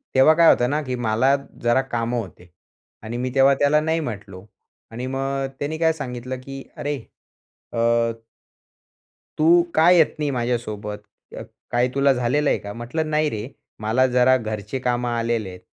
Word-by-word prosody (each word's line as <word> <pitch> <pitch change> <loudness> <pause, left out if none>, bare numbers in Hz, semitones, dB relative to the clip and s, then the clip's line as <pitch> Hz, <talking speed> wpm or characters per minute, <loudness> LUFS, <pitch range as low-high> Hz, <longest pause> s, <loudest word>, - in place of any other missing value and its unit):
तेव्हा 135 +4 +7
काय 165 0 +6
होते 120 - +4
ना, 150 +3 0
की 130 -2 -3
मला 120 +3 +2 0.3
जरा 120 +3 +3
कामं 120 -2 -2
होते 90 -4 -10 0.5
आणि 115 +2 -5
मी 125 +1 -2
तेव्हा 135 +1 +6
त्याला 145 +2 +3
नाही 160 +1 0
म्हटलो. 105 -8 -7 0.5
आणि 120 +3 -5
मग 135 0 -2
त्याने 150 +2 -3
काय 160 0 +2
सांगितलं, 125 -3 -6
की 135 0 -8
अरे, 145 0 -2 0.8
अ - - -4 1.6
"तू 155 +1 +2 0.3
का 160 +2 +5
येत 165 -4 +4
नाही 150 -1 0
माझ्यासोबत? 115 -4 -3 0.7
काय 120 +1 +2
तुला 140 0 +4
झालेलं 130 +4 +1
आहे - - +2
का?" 100 0 -8
म्हंटलं 130 +7 -3
"नाही 155 0 +1
रे, 110 +2 -5 0.3
मला 115 +5 +2
जरा 125 +1 +4
घरचे 110 +2 -5
कामं 125 -1 -1
आलेले 115 -3 -1
आहेत. 90 - -10
125 Hz, 160 wpm, -22 LUFS, 115-140 Hz, 1.6 s, तेव्हा